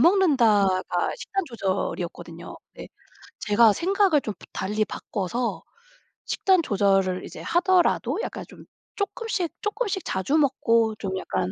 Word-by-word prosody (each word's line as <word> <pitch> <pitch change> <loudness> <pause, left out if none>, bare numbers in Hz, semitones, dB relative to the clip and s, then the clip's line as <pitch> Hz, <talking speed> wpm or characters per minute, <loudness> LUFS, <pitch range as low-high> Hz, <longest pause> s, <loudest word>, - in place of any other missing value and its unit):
먹는다.'가 235 - +3
식단 390 -5 -3
조절이었거든요. 180 - -4 0.2
근데 - - -10 0.5
제가 215 +1 +5
생각을 375 - +2
좀 215 - -4
부 - - -14
달리 210 +3 -1
바꿔서 225 +4 -3 0.6
식단 375 -3 +2
조절을 195 -4 +1
이제 - - -9
하더라도 360 +3 +2
약간 - - -6
좀 - - -14 0.3
쪼끔씩 405 -4 -2
쪼끔씩 415 -3 -2
자주 190 - 0
먹고 230 -6 +2
좀 190 -1 -3
약간 95 - -2
230 Hz, 280 characters per minute, -25 LUFS, -, 0.6 s, 제가